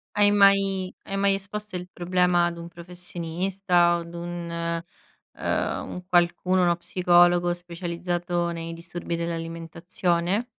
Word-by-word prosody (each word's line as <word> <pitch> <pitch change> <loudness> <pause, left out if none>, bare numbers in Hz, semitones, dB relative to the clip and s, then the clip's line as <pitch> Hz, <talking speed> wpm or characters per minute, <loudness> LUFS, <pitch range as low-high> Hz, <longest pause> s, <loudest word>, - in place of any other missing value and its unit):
Hai 205 0 +5
mai 195 -2 +4
hai 195 - -5
mai 200 0 +3
esposto 205 +1 -6
il 180 0 -5
problema 180 0 +2
ad 170 0 -3
un 170 0 -7
professionista? 175 +1 0
O - - -4
ad 170 0 -9
un, 170 0 -5 0.8
uhm, - - -2
un 180 - -7
qualcuno, 180 +1 +2
uno 175 -1 +3
psicologo 175 0 +3
specializzato 175 0 -3
nei 165 0 -5
disturbi 170 0 -5
dell'alimentazione? 170 +4 -2
175 Hz, 125 wpm, -25 LUFS, 170-185 Hz, 0.8 s, Hai